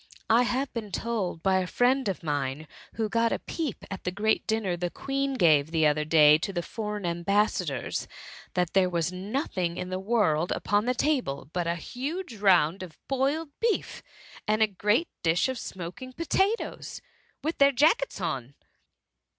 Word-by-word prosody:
I 230 +2 +6
have 265 +2 -1
been 220 -4 -5
told 200 -7 -2
by 190 -1 +3
a 185 - -2
friend 250 +3 +2
of 185 - -4
mine, 145 0 -2 0.3
ii^bo 220 -1 0
got 230 +1 +1
a - - +1
peep 310 -8 -5
at 195 - -6
the - - -1
great 215 +4 0
dinner 220 -5 0
the 175 0 -2
Queen 275 +5 -2
gave 155 - +4
the 160 -1 +2
other 150 0 +2
day 150 -1 +6
to 195 - -3
the 175 -3 -3
foreign 210 -2 -4
am* 170 0 -2
bassadors, 185 - 0 0.5
that 180 -2 0
there 190 -2 +4
was 170 0 -1
nothing 185 - -2
in 180 0 -5
the 185 - -2
world 190 -6 +1
Upon 205 +1 0
the 250 +1 +1
table, 240 - -1
but 175 -2 -1
a 170 - 0
huge 265 - -5
round 185 -3 +3
of 180 -4 -9
boiled 280 +4 0
beef, 460 -2 -1 0.5
and 215 +1 +3
a - - +4
great 210 - +1
dish 165 +5 +2
of 260 -2 -3
smoking 190 +9 -7
potatoes, 385 - -1 0.4
with 315 +3 -2
their 280 0 +6
jackets 280 -1 +2
on." 140 -7 -3
195 Hz, 175 wpm, -27 LUFS, 170-250 Hz, 0.5 s, I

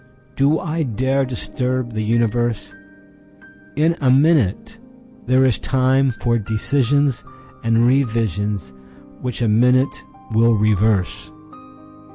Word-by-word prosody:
Do 140 +3 +2
I 165 -2 -3
dareDisturb 130 -1 -2
the 110 - -3
universe? 115 -1 -1 1.0
In 160 +3 +1
a 130 - +2
minute 145 - +2 0.5
there 130 +1 +3
is 125 -4 +1
timeFor 130 -3 0
decisions 135 +5 0 0.4
and 115 +1 +2
revisions 105 - -1 0.5
which 125 -1 -3
a - - +1
minute 125 +5 +2 0.3
will 115 +1 +3
reverse. 105 -2 0
120 Hz, 95 wpm, -19 LUFS, 110-135 Hz, 1.0 s, there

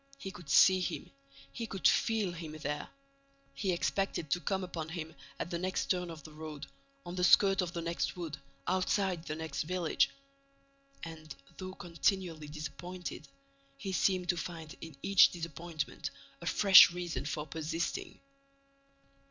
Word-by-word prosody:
He 195 - -6
could 175 -6 -12
see 185 +6 +7
him, 180 - -3 0.4
he 230 - -4
could 195 -4 +2
feel 220 -5 +2
him 165 -2 -7
there. 150 -1 -4 0.6
He 195 -3 -1
expected 175 -3 -1
to 175 - +3
come 190 +1 -1
upon 165 -3 -5
him 160 -1 -5 0.2
at 175 - -4
the 170 - -1
next 185 +1 -1
turn 180 -2 0
of 160 -3 -9
the 155 - -11
road, 155 -1 -7 0.4
on 175 - -6
the 180 0 -1
skirt 195 +2 +6
of 175 -1 -3
the 170 - -3
next 170 +2 -2
wood, 165 -4 -4 0.3
outside 185 -1 +1
the 155 - -3
next 160 -3 -3
village. 175 +1 +1 0.9
And, 160 -2 -8 0.2
though 185 0 -6
continually 170 -2 -1
disappointed, 155 +2 -6 0.5
he 190 +7 -4
seemed 185 -1 +1
to 175 - +2
find 165 -3 -6
in 160 -4 -9
each 195 -1 +7
disappointment 165 -1 -5 0.3
a - - -6
fresh 195 -2 +9
reason 175 -3 -4
for 150 0 -3
persisting. 165 - -3
175 Hz, 150 wpm, -32 LUFS, 160-185 Hz, 0.9 s, fresh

